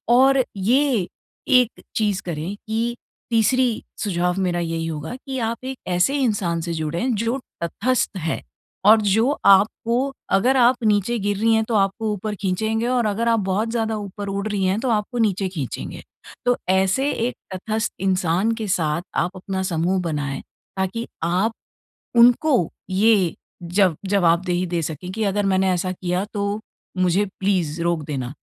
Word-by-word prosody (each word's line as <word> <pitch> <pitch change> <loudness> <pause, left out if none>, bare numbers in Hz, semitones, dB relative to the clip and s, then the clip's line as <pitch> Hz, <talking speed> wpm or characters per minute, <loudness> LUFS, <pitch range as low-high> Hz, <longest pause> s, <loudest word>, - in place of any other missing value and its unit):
और 265 +1 +5
ये, 240 -1 +2 0.4
एक 250 -3 +3
चीज़ 205 -3 +1
करें 170 +3 -4
कि 230 +2 -1 0.3
तीसरी 240 +1 +2 0.2
सुझाव 180 -3 0
मेरा 175 -2 0
यही 165 -1 -2
होगा 160 +4 -5
कि 265 0 -6
आप 230 +2 -6
एक 265 0 -4
ऐसे 180 +10 +2
इंसान 185 -8 0
से 170 0 -3
जुड़े 160 +5 -2 0.2
जो 235 +4 0 0.3
तटस्थ 215 +5 0
है 165 -2 -2 0.4
और 215 +1 +7
जो 215 +5 +3 0.2
आपको 230 +7 +3 0.2
अगर 260 +6 +3
आप 245 +1 +5
नीचे 210 +3 +2
गिर 205 0 -1
रही 225 +2 +3
हैं, 220 0 +3
तो 225 +1 -2
आपको 210 +2 +1
ऊपर 210 +1 -4
खींचेंगे 220 +4 0
और 245 -2 +1
अगर 215 +3 0
आप 230 -1 +3
बहुत 215 +4 0
ज़्यादा 225 -2 -1
ऊपर 205 0 -6
उड़ 200 +2 -2
रही 205 -2 -1
हैं 190 +3 +1
तो 255 - -1
आपको 220 +2 -1
नीचे 200 -4 +1
खींचेंगे। 150 -9 -5 0.4
तो 245 0 +3
ऐसे 190 +9 +2
एक 240 +2 -2 0.2
तटस्थ 220 +4 -2
इंसान 185 +2 +1
के 220 -2 -4
साथ 165 -4 0
आप 175 - +1
अपना 190 0 -3
समूह 180 +1 0
बनाएँ, 145 -5 -3 0.4
ताकि 190 +5 -2 0.2
आप 185 +7 +1 0.7
उनको 245 - +5 0.2
ये 195 -2 +3 0.3
जब 175 -1 +2
जवाबदेही 180 -1 +2
दे 175 -1 -1
सकें 160 +4 -5
कि 220 +1 -2
अगर 205 +1 0
मैंने 190 0 +2
ऐसा 185 +1 0
किया 180 +1 -2
तो 200 +1 -1 0.4
मुझे 185 +3 +3 0.2
प्लीज़ 180 -5 0
रोक 170 -2 0
देना। 135 -3 -4
200 Hz, 160 wpm, -22 LUFS, 180-225 Hz, 0.7 s, और